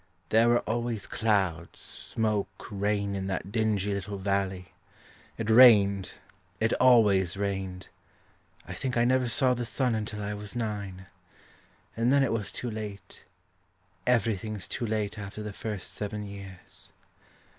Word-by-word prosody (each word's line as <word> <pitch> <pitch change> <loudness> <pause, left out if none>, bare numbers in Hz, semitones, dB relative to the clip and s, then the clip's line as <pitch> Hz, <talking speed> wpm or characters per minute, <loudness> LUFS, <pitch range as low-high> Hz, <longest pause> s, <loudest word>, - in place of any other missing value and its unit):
There 115 +2 +5
wre 120 0 +4
always 115 -1 -2
clouds, 100 -7 0
smoke, 105 -3 -2
rain 100 0 0
In 95 -1 -3
that 95 0 -3
dingly 105 -3 0
little 100 +1 -4
valley. 95 -1 -2 0.6
It 115 - -3
rained; 105 -5 +6 0.5
it 110 +1 +2
always 100 -8 +5
rained. 95 -2 -3 0.8
I - - -6
think 130 -2 -3
I 120 - +4
never 130 0 +2
saw 125 +2 +2
the 120 0 -3
sun 125 +1 0
until 105 -1 -3
I 100 +1 -3
was 105 +2 -8
nine 100 -5 -4 0.9
And 115 +2 +2
then 140 0 +5
it 135 - +1
was 105 -4 -3
too 120 - -4
late; 105 -2 -7 0.9
Everything's 110 -4 0
too 120 - -3
late 105 -1 -2
after 105 +1 -7
the 105 -1 -6
first 105 -1 -6
seven 105 0 -4
years. 100 -2 -11
105 Hz, 140 wpm, -28 LUFS, 100-115 Hz, 0.9 s, rained